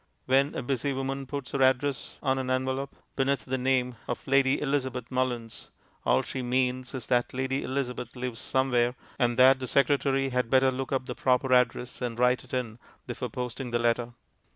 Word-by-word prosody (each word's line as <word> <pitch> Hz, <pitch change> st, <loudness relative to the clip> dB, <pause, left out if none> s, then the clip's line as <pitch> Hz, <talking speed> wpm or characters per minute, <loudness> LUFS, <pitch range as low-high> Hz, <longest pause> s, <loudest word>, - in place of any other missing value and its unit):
When 135 Hz, +3 st, +3 dB
a -, -, -3 dB
busy 135 Hz, +2 st, -1 dB
woman 135 Hz, 0 st, -3 dB
puts 140 Hz, -1 st, -5 dB
our 140 Hz, -, 0 dB
address 130 Hz, +1 st, +1 dB
on 135 Hz, -1 st, +1 dB
an 130 Hz, -1 st, -3 dB
envelope 130 Hz, +1 st, -1 dB, 0.2 s
beneath 135 Hz, 0 st, 0 dB
the 130 Hz, -, -1 dB
name 125 Hz, -1 st, +1 dB
of 120 Hz, -, -4 dB
Lady 135 Hz, 0 st, +3 dB
Elizabeth 130 Hz, -4 st, -2 dB
Mullins, 120 Hz, -3 st, -2 dB, 0.4 s
all -, -, +4 dB
she 130 Hz, -, -4 dB
means 125 Hz, 0 st, -1 dB
is 125 Hz, -, -5 dB
that 125 Hz, 0 st, +1 dB
Lady 130 Hz, +1 st, -1 dB
Elizabeth 125 Hz, -3 st, -3 dB
lives 125 Hz, -2 st, -4 dB
somewhere, 125 Hz, -2 st, +1 dB, 0.2 s
and 120 Hz, -2 st, +2 dB
that 130 Hz, +1 st, +7 dB
the 130 Hz, -, -4 dB
secretary 135 Hz, +1 st, +2 dB
had 125 Hz, -2 st, 0 dB
better 130 Hz, 0 st, +4 dB
look 130 Hz, 0 st, -4 dB
up 130 Hz, -1 st, 0 dB
the 125 Hz, -, -4 dB
proper 130 Hz, +1 st, +2 dB
address 125 Hz, 0 st, +1 dB
and 120 Hz, -2 st, -3 dB
write 125 Hz, +1 st, +3 dB
it -, -, -17 dB
in 120 Hz, -3 st, -3 dB, 0.3 s
before 125 Hz, 0 st, -4 dB
posting 125 Hz, +2 st, -5 dB
the 120 Hz, -, +1 dB
letter. 120 Hz, 0 st, 0 dB
130 Hz, 185 wpm, -28 LUFS, 125-135 Hz, 0.4 s, that